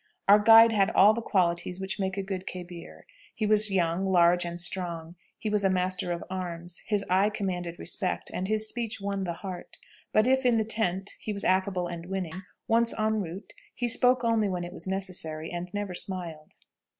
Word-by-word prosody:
"Our 205 +1 +8
guide 225 +2 +8
had 200 -3 +3
all 205 +3 +7
the 230 - -3
qualities 180 -3 0
which 190 +1 -4
make 190 0 -2
a 195 - -1
good 190 -1 -5
khebir. 175 -2 -9 0.3
He 215 - -1
was 215 0 +3
young, 175 -1 0
large, 175 -2 +3
and 170 0 -5
strong; 170 -2 -2 0.2
he 220 - -5
was 210 -1 +1
a 195 - +3
master 185 -1 -1
of 170 - -3
arms; 175 -2 -5
his 205 -3 0
eye 190 +3 +3
commanded 180 -5 -4
respect, 185 - -2
and 185 - -2
his 215 +1 +1
speech 230 -1 -3
won 200 -1 -3
the 170 - -2
heart. 180 +1 -8 0.3
But 215 - +3
if 265 +1 +3
in 245 -2 +3
the 220 - +1
tent 200 -3 -1
he 215 - -5
was 200 - -5
affable 185 -1 +1
and 170 0 -7
winning, 185 -2 -4 0.3
once 230 0 +2
en 220 0 +1
route 180 +2 -8 0.2
he 245 - -1
spoke 250 +2 +3
only 225 -3 +2
when 180 -2 -3
it 175 +1 -7
was - - -6
necessary, 180 -5 -3
and 175 +1 -5
never 205 -2 -4
smiled." 175 -4 -6
190 Hz, 200 wpm, -27 LUFS, 175-210 Hz, 0.3 s, Our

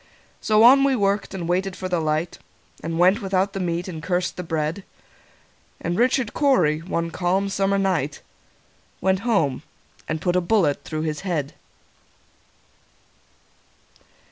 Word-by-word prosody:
So 215 0 +4
on 270 +3 +8
we 275 -1 +3
worked, 200 -2 0
and 175 -3 -4
waited 185 +2 -1
for 185 - -5
the 180 -2 0
light, 155 +2 -2 0.4
And 165 0 -3
went 185 +6 +4
without 195 0 0
the 195 - -4
meat, 175 0 -2
and 165 -4 -6
cursed 180 +1 -1
the - - -5
bread; 160 +2 -3 1.0
And 170 +1 -2
Richard 250 +1 +1
Cory, 180 - +2
one 170 0 -3
calm 185 +3 0
summer 195 0 +1
night, 180 -7 -1 0.8
Went 190 0 +1
home 195 - 0 0.5
and 155 0 -2
put 175 +1 0
a 180 - +3
bullet 175 -6 +1
through 155 -1 -4
his 155 -2 -2
head. 165 -7 -3
180 Hz, 145 wpm, -23 LUFS, 165-195 Hz, 1.0 s, on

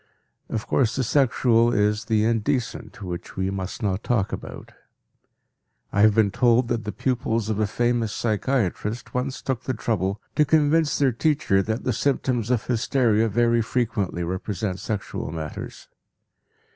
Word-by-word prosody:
Of 110 -1 -3
course, 120 -4 +1
the 135 - 0
sexual 120 -2 +3
is 105 0 +1
the 110 -2 +2
indecent, 115 -1 -1
which 90 -2 -6
we 95 0 -1
must 95 +2 -5
not 100 -1 0
talk 110 -5 0
about. - - -7 1.2
I 100 - +3
have 105 -1 +6
been 110 -3 +3
told 120 +2 +3
that 115 -3 -1
the 105 - -2
pupils 115 -4 -1
of 110 -1 -1
a 110 - +2
famous 120 0 0
psychiatrist 110 -1 -1
once 130 +1 -3
took 130 -2 -2
the 130 - -1
trouble 105 -3 -1 0.2
to 150 - +6
convince 150 0 +3
their 135 -2 +3
teacher 130 -6 +2
that 110 +3 -3
the 125 - 0
symptoms 125 -2 0
of 125 -3 +1
hysteria 115 -2 +2
very 120 +1 +2
frequently 110 -7 -1
represent 95 +2 -3
sexual 105 -7 -4
matters. 80 -2 -7
115 Hz, 150 wpm, -24 LUFS, 105-125 Hz, 1.2 s, have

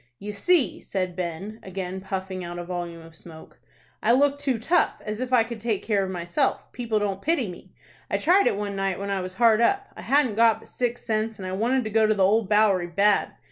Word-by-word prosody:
"You 210 +1 -6
see," 260 - +2
said 185 -2 -3
Ben, 185 +5 -5
again 190 0 -5
puffing 190 -1 -4
out 175 0 -6
a 175 - -4
volume 175 -2 -5
of 165 0 -15
smoke, 160 -1 -14 0.4
"I 230 - +3
look 285 +2 +3
too 270 -4 0
tough, 315 +11 +1
as 215 +2 -4
if 255 0 -3
I 245 -3 +5
could 230 0 -7
take 220 -2 -2
care 205 -3 +1
of 190 - -3
myself. 180 - -1
People 235 -3 -2
don't 200 -2 -2
pity 295 -5 +1
me. 180 -2 -11 0.3
I - - +1
tried 375 +5 +4
it - - +2
one 205 -1 -3
night 195 -1 -1
when 200 0 -4
I 195 -1 -1
was 185 0 -6
hard 225 +1 +4
up. 395 +11 +1
I - - -9
hadn't 275 -5 +2
got 230 -1 +5
but - - -17
six 245 -1 -3
cents, 220 -1 -1
and 190 - -7
I - - -4
wanted 240 +7 +1
to 215 - -5
go 220 0 +4
to 215 - +2
the 195 - +2
Old 215 +1 +2
Bowery 210 -4 +3
bad. 200 +3 +2
210 Hz, 235 wpm, -25 LUFS, 185-235 Hz, 0.4 s, I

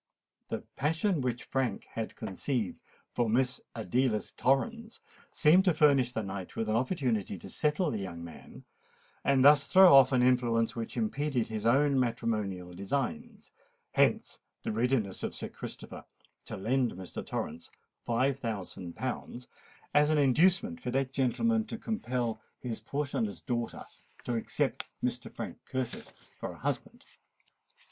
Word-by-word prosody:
The - - -4
passion 160 +4 +1
which 125 -2 -2
Frank 130 -6 -1
had 115 -1 -4
conceived 110 +1 -2 0.3
for 120 -2 +1
Miss 125 +3 +2
Adelais 115 +1 0
Torrens 225 - 0 0.3
seemed 170 +5 +5
to 180 -4 +3
furnish 140 -5 +4
the 110 -3 -2
knight 95 -2 -6
with 110 - -2
an 110 - +2
opportunity 120 - 0
to - - -10
settle 150 +2 +1
the 110 - -2
young 85 -3 -6
man, 85 -2 -11 0.6
and 135 -1 +4
thus 145 -1 +7
throw 185 -4 +8
off 135 -1 +8
an 125 -2 +3
influence 120 -3 +2
which 115 -1 -5
impeded 145 - 0
his 110 0 -2
own 140 +2 +4
matrimonial 110 -7 -1
designs: 205 - -3 0.4
hence - - +2 0.2
the 225 - -2
readiness 125 - 0
of - - -3
Sir - - -4
Christopher - - -8 0.4
to - - -6
lend 125 +4 +1
Mr. 95 -1 -7
Torrens 80 +2 -5 0.3
five 130 +3 +1
thousand 95 -7 -5
pounds 125 -1 -5 0.5
as 150 0 +5
an 155 - +3
inducement 185 - +3
for - - -3
that 135 +1 0
gentleman 225 - +2
to 230 - -5
compel 125 - -2 0.2
his 120 -3 -4
portionless 125 - -2
daughter 120 -1 -3 0.4
to 120 - -2
accept 115 - -1 0.2
Mr. - - -2
Frank - - -6
Curtis 130 -2 -4 0.3
for - - -4
a - - -13
husband. - - -4
125 Hz, 145 wpm, -30 LUFS, 110-145 Hz, 0.6 s, throw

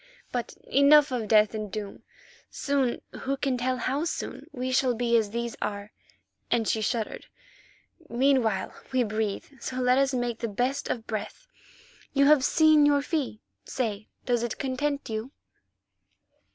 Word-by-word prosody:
But 245 -1 -3
enough 280 +1 +5
of 235 -4 -2
death 215 0 +5
and 215 -2 -4
doom. 205 0 -6 0.5
Soon, 275 -4 -1
who 275 +1 -3
can 270 -1 0
tell 255 +1 -1
how 270 +5 -1
soon? 335 - -5
we 255 0 -3
shall 255 -1 +2
be 235 0 +1
as 220 -3 +3
these 235 +1 -3
are," 205 0 -4 0.6
and 225 -2 +1
she 220 - +1
shuddered. 220 0 -2 0.8
"Meanwhile, 245 -4 +1 0.2
we 255 -1 +2
breathe, 215 -2 -2
so 255 - -5
let 255 +1 +3
us 275 0 +2
make 245 -3 -2
the 235 - -2
best 245 +6 -1
of 225 -2 -3
breath. 215 - -5 0.7
You 280 0 +4
have 290 -2 +6
seen 310 0 +5
your 290 -1 +4
fee, 285 -9 -2 0.2
say, 220 -4 -3 0.2
does 245 -2 +1
it 235 -1 -3
content 280 +2 -2
you?" 220 +4 -4
245 Hz, 150 wpm, -27 LUFS, 220-275 Hz, 0.8 s, have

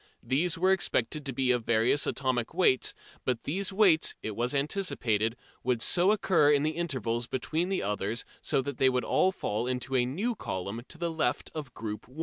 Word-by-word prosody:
These 165 +6 +1
were 185 +3 +3
expected 150 -5 0
to - - -1
be 130 0 +1
of 125 -2 +1
various 115 +5 +2
atomic 130 0 -1
weights, 150 -9 +3 0.3
but 125 -3 -1
these 190 +6 -1
weights, 190 -5 +4
it 110 - -4
was 120 +5 -1
anticipated, 125 - 0 0.3
would 125 -2 +1
so 180 +3 +4
occur 185 -8 +3
in 145 -1 +3
the 155 - +1
intervals 125 -8 -2
between 160 +8 -2
the 195 - -1
others 105 +3 -2 0.2
that 135 -1 0
they 130 - +5
would 125 -1 0
all 190 - +3
fall 115 - -3
into 130 +1 -2
a 125 -1 +3
new 200 - -1
column 100 - -5
to 165 - -9
the 170 0 -2
left 160 -1 -1
of 150 -6 -7
"Group 105 -1 -6
1." 130 +5 -14
135 Hz, 190 wpm, -29 LUFS, 120-170 Hz, 0.3 s, they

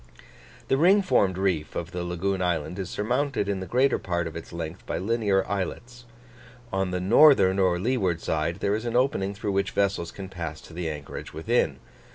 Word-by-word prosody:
The 135 - +2
ring 190 +7 +5
formed 95 - +2
reef 90 -5 -1
of 85 +1 -4
the 90 -2 -4
lagoon 90 +2 -2
island 90 +1 -1
is 95 -2 -4
surmounted 125 +2 -1
in 100 -1 -1
the 95 - -6
greater 130 +2 +2
part 85 -2 -2
of 80 -1 -6
its 85 - -8
length 85 -2 -6
by - - -2
linear 100 -2 +1
islets. 120 +5 -4 0.7
On 95 -1 0
the 90 0 -2
northern 100 -1 +6
or 90 -2 +3
leeward 95 -5 0
side, 80 +3 -2
there 100 - +1
is 110 +2 -2
an 120 0 -2
opening 100 -6 +1
through 100 +1 -3
which 100 0 0
vessels 100 -4 0
can 95 -1 -8
pass 85 -4 -6
to - - -14
the 85 -1 -3
anchorage 75 -2 -7
within. 80 - 0
95 Hz, 195 wpm, -26 LUFS, 85-110 Hz, 0.7 s, northern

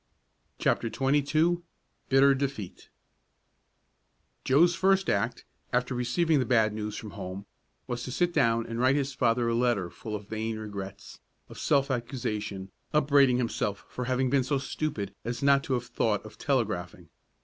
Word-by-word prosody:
CHAPTER 115 - +1
XXII 145 +5 +2 0.5
BITTER 135 +1 +6
DEFEAT 135 -8 -4 1.5
Joe's 165 +6 +4
first 190 +2 +2
act, 100 - -1 0.3
after 125 +1 0
receiving 135 +6 +1
the 130 - +1
bad 110 -4 +3
news 105 0 -4
from 105 - -7
home, 95 +2 -7 0.4
was 120 0 -4
to 125 - -5
sit 175 +6 +1
down 115 -3 +2
and 115 0 -5
write 130 +2 +4
his 140 -1 -1
father 120 -2 +1
a 115 - +1
letter 115 -7 +1
full 110 -2 -6
of 105 -1 -7
vain 110 0 -3
regrets, 100 -3 -8 0.3
of - - -10
self 140 0 +2
accusation, 105 -6 -3 0.2
upbraiding 140 -4 +4
himself 115 -4 -2
for 125 - -4
having 130 0 0
been 135 -2 +3
so 140 +2 0
stupid 130 -8 -3
as 120 +3 -4
not 140 0 +5
to 135 - -1
have 120 -1 -1
thought 105 -4 -1
of 110 0 -12
telegraphing. 90 - -2
125 Hz, 155 wpm, -28 LUFS, 110-140 Hz, 1.5 s, BITTER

